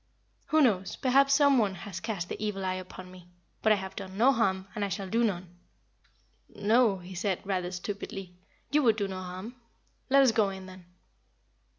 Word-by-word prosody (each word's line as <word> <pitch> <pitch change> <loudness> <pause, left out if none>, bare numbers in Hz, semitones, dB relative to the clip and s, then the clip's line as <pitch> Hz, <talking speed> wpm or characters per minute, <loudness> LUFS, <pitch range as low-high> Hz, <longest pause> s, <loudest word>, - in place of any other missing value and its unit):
"Who 310 0 +3
knows? 195 -6 +1
Perhaps 275 +1 +4
some 280 -2 +5
one 200 -4 +1
has 180 -1 -7
cast 205 -4 -4
the 215 - -5
evil 195 -2 -2
eye 185 - 0
upon 185 0 -8
me. 180 -1 -14 0.3
But 220 - +3
I - - +6
have 190 -1 -6
done 195 -2 -7
no 245 +5 +6
harm, 190 -6 0
and 210 -2 -3
I 200 - -1
shall 195 +1 -4
do 230 +5 +1
none." 180 -4 -3 1.0
"No," 220 -1 +3
he 180 +1 -10
said, 185 0 -1
rather 185 -2 -1
stupidly. 190 0 -6 0.4
"You 300 +1 +4
would 230 -5 +4
do 205 -2 -1
no 190 -1 -5
harm. 185 +7 -7 0.5
Let 275 +1 +6
us 260 - +5
go 215 -3 +2
in, 190 -1 -8
then." 185 -1 -12
195 Hz, 195 wpm, -29 LUFS, 185-225 Hz, 1.0 s, I